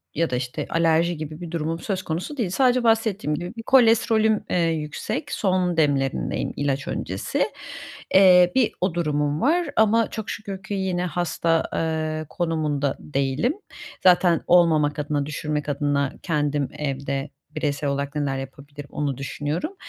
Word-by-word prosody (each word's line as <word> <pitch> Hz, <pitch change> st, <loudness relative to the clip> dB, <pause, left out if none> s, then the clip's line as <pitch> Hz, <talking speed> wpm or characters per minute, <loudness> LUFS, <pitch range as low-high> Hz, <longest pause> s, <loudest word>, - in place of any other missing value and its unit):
ya 165 Hz, -2 st, +1 dB
da, 125 Hz, -, -1 dB
işte, 125 Hz, 0 st, -3 dB
alerji 165 Hz, 0 st, +2 dB
gibi 155 Hz, +2 st, -7 dB
bir 170 Hz, -2 st, -7 dB
durumum 165 Hz, 0 st, -2 dB
söz 190 Hz, -3 st, -3 dB
konusu 180 Hz, -, -4 dB
değil. 215 Hz, -7 st, 0 dB
Sadece 250 Hz, +4 st, +2 dB
bahsettiğim 220 Hz, -8 st, +1 dB
gibi 175 Hz, +6 st, -6 dB
bir 225 Hz, -, -6 dB
kolesterolüm, 225 Hz, -3 st, +4 dB
eee, -, -, +1 dB
yüksek, 160 Hz, -2 st, -2 dB
son 185 Hz, -3 st, 0 dB
demlerindeyim 135 Hz, -, 0 dB
ilaç 140 Hz, -1 st, -1 dB
öncesi. 95 Hz, +1 st, -2 dB, 0.7 s
Eee, 180 Hz, -2 st, +7 dB
bir 255 Hz, -4 st, +3 dB
o 185 Hz, -2 st, +1 dB
durumum 150 Hz, -3 st, 0 dB
var 330 Hz, +4 st, +2 dB
ama 220 Hz, +1 st, +3 dB
çok 220 Hz, -2 st, -6 dB
şükür 195 Hz, -2 st, -6 dB
ki 210 Hz, -, -5 dB
yine 185 Hz, -2 st, -1 dB
hasta, 165 Hz, -1 st, 0 dB
eee, 155 Hz, -1 st, -1 dB
konumunda 155 Hz, -5 st, -1 dB
değilim. 140 Hz, -, -1 dB, 0.5 s
Zaten 180 Hz, -2 st, +5 dB
olmamak 155 Hz, -4 st, +4 dB
adına, 145 Hz, -1 st, -1 dB
düşürmek 150 Hz, 0 st, -3 dB
adına 140 Hz, -1 st, 0 dB
kendim 145 Hz, -4 st, 0 dB
evde 140 Hz, 0 st, -3 dB, 0.3 s
bireysel 145 Hz, -2 st, -1 dB
olarak 140 Hz, +1 st, -3 dB
neler 140 Hz, -2 st, -1 dB
yapabilirim, 140 Hz, +2 st, -10 dB
onu 140 Hz, -3 st, -2 dB
düşünüyorum. 150 Hz, -, -3 dB
160 Hz, 145 wpm, -23 LUFS, 145-185 Hz, 0.7 s, Eee